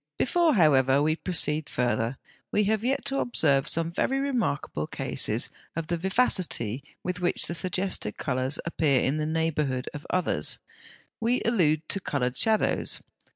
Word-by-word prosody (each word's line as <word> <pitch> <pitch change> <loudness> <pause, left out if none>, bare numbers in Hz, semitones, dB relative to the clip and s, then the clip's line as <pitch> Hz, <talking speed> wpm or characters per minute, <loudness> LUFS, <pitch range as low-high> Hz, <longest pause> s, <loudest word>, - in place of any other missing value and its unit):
Before, 330 +1 +2
however, 135 -6 +4
we 155 +2 +2
proceed 160 -3 0
further, 120 0 -1 0.3
we 210 - +2
have 215 +1 0
yet 265 +3 0
to 275 0 0
observe 145 - +2
some 165 0 +3
very 270 +10 0
remarkable 230 - -1
cases - - -1 0.2
of 165 0 -3
the 170 - 0
vivacity 175 - +1 0.2
with 180 0 -3
which 175 0 +1
the - - -2
suggested 185 - -2
colours 130 +2 -1
appear 155 -5 +2
in 140 +3 0
the 155 0 -1
neighbourhood 155 -5 -1
of 150 - -8
others: 185 -1 +1 0.6
we 235 +3 +1
allude 160 -9 +2
to 195 - +1
coloured 125 -8 -2
shadows. 220 -1 +1
165 Hz, 150 wpm, -27 LUFS, 140-195 Hz, 0.6 s, however